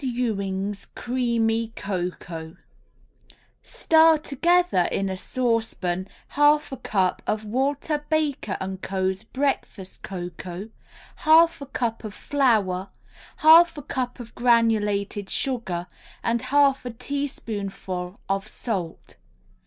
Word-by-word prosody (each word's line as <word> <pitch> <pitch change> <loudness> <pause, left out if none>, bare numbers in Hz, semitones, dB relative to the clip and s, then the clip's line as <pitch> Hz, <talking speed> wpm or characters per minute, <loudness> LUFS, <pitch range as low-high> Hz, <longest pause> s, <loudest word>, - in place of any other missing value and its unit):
EWING'S 200 -5 -2
CREAMY 230 -2 0
COCOA 175 -3 -5 1.0
Stir 320 0 +4
together 335 - +2
in 195 0 0
a 190 - -2
saucepan 220 -5 -1 0.2
half 295 +1 +3
a 270 - -5
cup 190 -5 0
of 215 0 -1
Walter 280 +6 -1
Baker 300 -10 0 0.2
& - - -32
Co.'s 190 +1 -1
Breakfast 255 -7 -3
Cocoa, 180 +2 -6 0.5
half 325 0 +5
a 280 - -6
cup 235 -4 -2
of 215 -2 -7
flour, 210 -9 +1 0.5
half 330 +1 +7
a 295 - -6
cup 255 -2 -3
of 235 -1 -9
granulated 210 -4 +2
sugar 190 -10 -2 0.4
and 230 0 +1
half 275 +1 +3
a 250 - -4
teaspoonful 210 -8 -4
of 195 +1 -1
salt. 190 -8 -5
225 Hz, 105 wpm, -24 LUFS, 195-275 Hz, 1.0 s, half